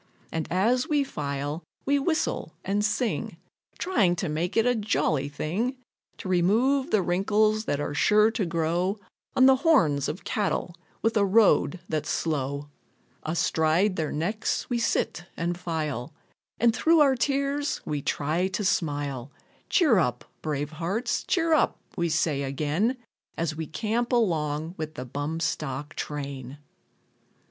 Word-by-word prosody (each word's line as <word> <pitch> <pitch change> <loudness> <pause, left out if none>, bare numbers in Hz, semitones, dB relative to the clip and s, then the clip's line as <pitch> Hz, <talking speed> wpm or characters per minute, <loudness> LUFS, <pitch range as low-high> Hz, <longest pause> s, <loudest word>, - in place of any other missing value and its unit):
And 160 -2 -2
as 230 +8 +2
we 295 -2 +3
file, 145 - -4 0.2
we 285 +1 +3
whistle 315 +3 -1
and 205 +2 +1
sing, 220 +3 -1 0.4
Trying 200 - +2
to 175 0 -2
make 165 +6 -2
it 225 - +4
a 245 - +4
jolly 155 - 0
thing, 200 - -2 0.4
To - - -7
remove 225 +10 +2
the 205 -3 +2
wrinkles 215 +4 +2
that 145 - -1
are 145 - -2
sure 210 +7 +4
to 220 -2 -1
grow 170 +4 0 0.4
On 260 - +6
the 265 0 +7
horns 210 - +3
of 180 - -5
cattle 200 -4 -1 0.3
with 225 +1 +2
a 205 - +4
road 195 -3 +4
that's 155 -2 -2
slow. 140 -2 -1 0.5
Astride 165 +4 +1
their 155 -3 -2
necks, 205 +9 -1
we 240 - +1
sit 175 -6 0
and 175 +1 -1
file, 155 -6 -4 0.4
And 230 0 +4
through 330 +4 +4
our 275 -2 +5
tears, 280 +3 0
we 150 -2 -2
try 155 +7 0
to 190 +2 -3
smile. 145 -6 -1 0.4
Cheer 290 - +4
up, 125 -7 -1 0.2
brave 150 -1 -2
hearts, 185 +10 -2
cheer 330 -3 +2
up, 310 - +3 0.2
we 170 -1 0
say 155 -2 +1
again, 150 - 0 0.4
As 165 -2 -1
we 160 0 -4
camp 225 - -1
along 160 -8 0
with 155 0 -4
the 125 - -5
bum 145 +5 -3
stock 150 -3 -3
train. 140 -2 -5
175 Hz, 145 wpm, -26 LUFS, 150-225 Hz, 0.5 s, the